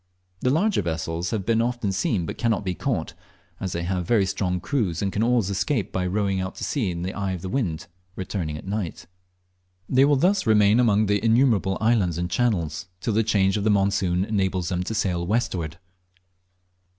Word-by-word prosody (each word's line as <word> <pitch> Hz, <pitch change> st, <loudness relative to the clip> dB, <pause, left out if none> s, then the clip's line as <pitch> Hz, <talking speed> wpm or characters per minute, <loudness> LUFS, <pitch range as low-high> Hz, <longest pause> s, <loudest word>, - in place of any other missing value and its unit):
The 125 Hz, -, +1 dB
larger 180 Hz, -, +2 dB
vessels 85 Hz, 0 st, -3 dB
have 105 Hz, -5 st, -2 dB
been 115 Hz, 0 st, +2 dB
often 120 Hz, -4 st, -1 dB
seen 95 Hz, -1 st, 0 dB
but -, -, -6 dB
cannot 115 Hz, -5 st, 0 dB
be 90 Hz, -, -1 dB
caught, -, -, -2 dB, 0.5 s
as 95 Hz, -2 st, -3 dB
they 85 Hz, -, -2 dB
have 90 Hz, -1 st, -2 dB
very 110 Hz, -5 st, +3 dB
strong 95 Hz, -1 st, -1 dB
crews, 100 Hz, -, -1 dB
and 100 Hz, -, 0 dB
can 105 Hz, -, 0 dB
always 115 Hz, -4 st, +2 dB
escape 110 Hz, +4 st, -1 dB
by 90 Hz, -1 st, -1 dB
rowing 95 Hz, 0 st, 0 dB
out 95 Hz, 0 st, -4 dB
to -, -, -7 dB
sea 125 Hz, -10 st, -1 dB
in 85 Hz, -1 st, -4 dB
the 95 Hz, +2 st, -3 dB
eye 100 Hz, -2 st, -2 dB
of 90 Hz, -, -6 dB
the 95 Hz, -, -4 dB
wind, 90 Hz, -11 st, -2 dB, 0.3 s
returning 90 Hz, -5 st, -3 dB
at 75 Hz, -, -10 dB
night. 95 Hz, -4 st, -4 dB, 0.8 s
They 130 Hz, +1 st, +4 dB
will 145 Hz, 0 st, +4 dB
thus 185 Hz, -, +2 dB
remain 105 Hz, +1 st, +5 dB
among 110 Hz, -3 st, +3 dB
the 100 Hz, 0 st, 0 dB
innumerable 115 Hz, -5 st, +3 dB
islands 105 Hz, -7 st, +2 dB
and 90 Hz, 0 st, -3 dB
channels, 90 Hz, -6 st, 0 dB
till 110 Hz, -, -2 dB
the 110 Hz, -, +3 dB
change 100 Hz, -2 st, +2 dB
of 100 Hz, -, -2 dB
the 110 Hz, -, +2 dB
monsoon 95 Hz, -2 st, +2 dB
enables 95 Hz, -4 st, -1 dB
them 90 Hz, -1 st, -1 dB
to 110 Hz, -, -3 dB
sail 90 Hz, -4 st, 0 dB
westward. 90 Hz, -6 st, -1 dB
100 Hz, 200 wpm, -24 LUFS, 90-115 Hz, 0.8 s, remain